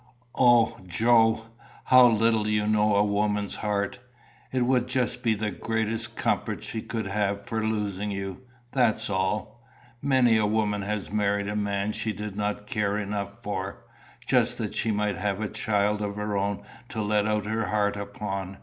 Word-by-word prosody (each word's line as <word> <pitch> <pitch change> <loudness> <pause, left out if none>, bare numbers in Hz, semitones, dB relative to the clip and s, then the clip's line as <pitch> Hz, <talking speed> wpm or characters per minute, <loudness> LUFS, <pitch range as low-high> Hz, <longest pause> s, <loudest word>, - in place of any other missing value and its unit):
"O, 120 -2 +4
Joe! 115 +3 +3 0.4
how 130 -1 +7
little 115 -1 +2
you 105 -1 +1
know 105 -1 +3
a 100 - +4
woman's 105 0 0
heart! 105 +1 -2 0.5
It 130 -1 +1
would 125 -1 +2
just 125 -1 -1
be 115 -3 +2
the 105 0 -2
greatest 110 +4 -2
comfort - - -1
she 110 - -4
could 110 -1 -4
have 100 0 0
for 110 0 -3
losing 105 -2 -1
you 95 0 -5 0.3
that's 110 -5 +2
all. 105 +4 -2 0.4
Many 130 -5 +4
a 105 -1 +2
woman 105 -1 0
has 105 0 -3
married 100 -1 +1
a 105 - -3
man 100 0 -1
she 110 0 -3
did 105 0 -6
not 105 0 -2
care 105 -1 0
enough 100 +2 -4
for, 100 -2 -4 0.4
just - - +2
that - - -3
she 115 - 0
might 105 -2 0
have 100 +1 -1
a 110 - -1
child 105 0 0
of 100 -1 -3
her 105 0 -2
own 100 +1 -1 0.3
to 110 - -5
let 105 0 +1
out 105 -1 0
her 110 0 -1
heart 105 0 +1
upon. 100 -1 -5
105 Hz, 170 wpm, -26 LUFS, 100-110 Hz, 0.5 s, how